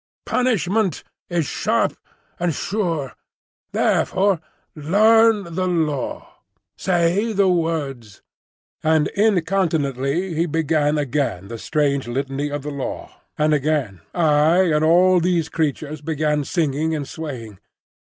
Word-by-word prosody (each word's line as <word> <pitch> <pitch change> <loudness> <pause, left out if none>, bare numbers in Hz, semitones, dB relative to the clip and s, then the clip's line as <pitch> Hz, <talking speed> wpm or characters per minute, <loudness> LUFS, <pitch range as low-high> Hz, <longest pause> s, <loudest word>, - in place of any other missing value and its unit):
"Punishment 220 -5 0 0.3
is 170 -3 0
sharp - - 0 0.4
and 175 -3 0
sure. 170 - -2 0.6
Therefore 190 -3 +1 0.3
learn 210 +4 +3
the 185 +2 -1
Law. 155 -6 -2 0.4
Say 185 +5 +1
the 200 -1 +3
words." 150 - -2 0.6
And 155 -1 +2
incontinently 170 - 0
he 165 +2 0
began 155 -1 +1
again 135 -9 -2
the 115 -1 -6
strange 140 -2 0
litany 135 +3 -2
of 145 -1 -4
the 150 - -4
Law, 140 -2 -5 0.3
and 155 0 +2
again 140 - -1
I 160 +2 +3
and 150 0 +2
all 180 +3 +5
these 170 -2 0
creatures 155 -1 -2
began 150 -1 -1
singing 160 -1 0
and 145 -3 -4
swaying. 125 - -7
155 Hz, 115 wpm, -21 LUFS, 145-180 Hz, 0.6 s, all